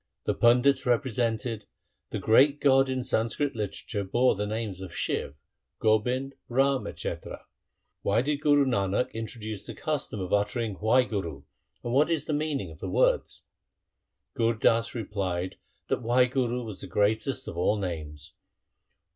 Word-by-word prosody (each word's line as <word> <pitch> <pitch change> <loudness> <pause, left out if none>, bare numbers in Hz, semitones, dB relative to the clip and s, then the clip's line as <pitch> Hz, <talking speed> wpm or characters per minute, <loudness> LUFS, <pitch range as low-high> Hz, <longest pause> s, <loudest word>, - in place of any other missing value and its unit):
1 - - 0
The - - -22
pandits 125 +3 +4
represented, 115 -2 0 0.2
' - - -51
The - - -3
great 140 +6 +4
God 135 -1 +4
in 130 -1 -1
Sanskrit 125 +5 0
literature 105 0 -3
bore 120 +7 +3
the 105 +1 -3
names 105 -3 -4
Shiv, 70 - -2 0.4
Gobind, 125 +5 +1 0.2
Ram, 135 +2 +1
&c. - - -2 0.9
Why 105 +4 +2
did 145 +1 -1
Guru 145 -2 +4
Nanak 100 -3 0
introduce 110 -2 -6
the - - -8
custom 145 -8 -3
of 95 -1 -3
uttering 105 0 0
Wahguru 105 - +1 0.4
and 120 - -3
what 145 +5 +4
is 165 -3 0
the 155 - -2
meaning 145 - -2
of 80 - -13
the - - -4
words? - - +1 0.5
' - - -56
Gur 115 0 +2
Das 115 +2 +2
replied 95 -5 -3 0.3
that - - -1
Wahguru 125 0 +1
was 105 -4 -8
the - - -7
greatest 110 +6 0
of - - -6
all 90 +5 +1
names. 80 -6 -5
115 Hz, 150 wpm, -28 LUFS, 105-130 Hz, 0.9 s, pandits